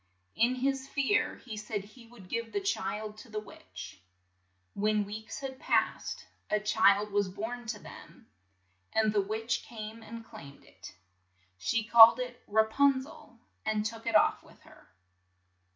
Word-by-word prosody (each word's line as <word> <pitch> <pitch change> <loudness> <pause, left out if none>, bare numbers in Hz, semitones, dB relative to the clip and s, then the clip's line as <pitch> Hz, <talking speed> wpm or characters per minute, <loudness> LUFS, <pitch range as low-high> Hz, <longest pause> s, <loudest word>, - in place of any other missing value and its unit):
' 95 -1 -44
' - - -43
"In 250 +2 0
his 270 +1 -1
fear 280 +9 +1
he 225 -4 -6
said 210 -1 -4
he 230 +3 -16
would 225 -6 -15
give 230 +3 -3
the - - 0
child 215 - -3
to 240 - -13
the 215 0 -3
witch. 95 - -11 0.7
When 210 0 +1
weeks 220 +4 -7
had 265 -1 -6
passed, - - 0 0.2
a 210 - +2
child 210 -1 +3
was 200 -1 +1
born 225 +5 -6
to 220 -1 -3
them, - - -13 0.7
and 220 -1 +2
the 205 - +3
witch 220 +4 -2
came 220 0 -8
and 225 +1 -9
claimed 140 -7 -12
it. - - -13 0.6
She 220 - 0
called 230 +2 +9
it 250 -1 -5
Ra 220 +1 +4
pun 270 +3 +3
zel, 275 - -14 0.3
and 215 -1 0
took 225 +1 -5
it 230 - 0
off 215 - +4
with - - -19
her. - - -19
220 Hz, 170 wpm, -30 LUFS, 210-235 Hz, 0.7 s, called